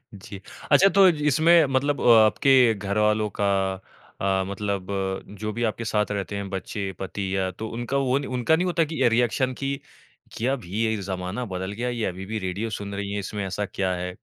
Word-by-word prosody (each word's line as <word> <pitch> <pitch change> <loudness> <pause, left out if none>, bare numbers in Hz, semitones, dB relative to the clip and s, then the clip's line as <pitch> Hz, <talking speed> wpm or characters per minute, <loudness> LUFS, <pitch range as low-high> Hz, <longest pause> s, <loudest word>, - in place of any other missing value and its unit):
जी। 100 0 -10 0.3
अच्छा 195 - +7
तो 195 -1 +6
इसमें 160 +1 +4
मतलब 145 +2 0
आपके 115 +3 +5 0.2
घरवालों 105 +2 +1
का - - +2 0.8
अ, 95 -1 +1
मतलब 100 -1 -3 0.5
जो 105 0 -3
भी 120 +3 -4
आपके 115 - -7
साथ 105 -1 0
रहते 100 0 -3
हैं 100 -1 -4
बच्चें, 95 0 -4
पति 95 +1 -4
या 95 -1 0
तो 110 +4 -7
उनका 120 +3 -2
वो 130 +2 +3
नहीं 140 - -6
उनका 160 +6 +3
नहीं 180 +2 0
होता 170 -2 +2
कि - - -4
ये - - +6
रिएक्शन 125 +2 +1
कि 135 0 0 0.6
कि 115 - -3
अब 135 -3 0
ये 110 +5 -1
ज़माना 95 +5 -4
बदल 95 -2 -5
गया, 120 +4 -3
ये 120 -2 -2
अभी 95 +1 -5
भी 110 +1 -3
रेडियो 100 +4 -3
सुन 100 -1 -5
रही 100 0 -4
हैं, 100 - -2
इसमें 100 0 -4
ऐसा 105 +2 -3
क्या 95 -1 +1
है? 90 - -3
105 Hz, 200 wpm, -24 LUFS, 100-125 Hz, 0.8 s, अच्छा